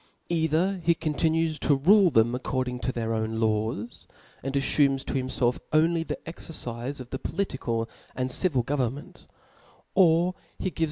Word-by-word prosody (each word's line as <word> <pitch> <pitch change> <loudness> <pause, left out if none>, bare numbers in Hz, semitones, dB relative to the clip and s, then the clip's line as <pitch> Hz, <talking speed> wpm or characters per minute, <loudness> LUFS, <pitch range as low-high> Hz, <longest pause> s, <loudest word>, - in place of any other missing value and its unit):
J^ither 170 +3 +1
he 170 0 +3
continues 160 0 0
to 140 +2 +3
rule 185 +7 +5
them 115 -4 +3
accordinjg 125 0 -2
to 130 - -1
they* 120 -2 -3
own 110 0 -1
lawsy 110 +1 -1 0.3
and 135 +1 -4
a^Tumes 140 -1 +2
to - - -3
bimfelf 130 -2 0
only 165 +2 +3
the 165 - -4
exerdfe 140 -5 -5
of 125 -1 -9
the 130 - -3
political 120 -11 -2 0.3
and 130 0 -1
civil 135 -4 +2
gdvernment; 135 +1 -3 0.7
or 175 -1 +4 0.2
heaves 185 - -4
135 Hz, 145 wpm, -27 LUFS, 120-165 Hz, 0.7 s, rule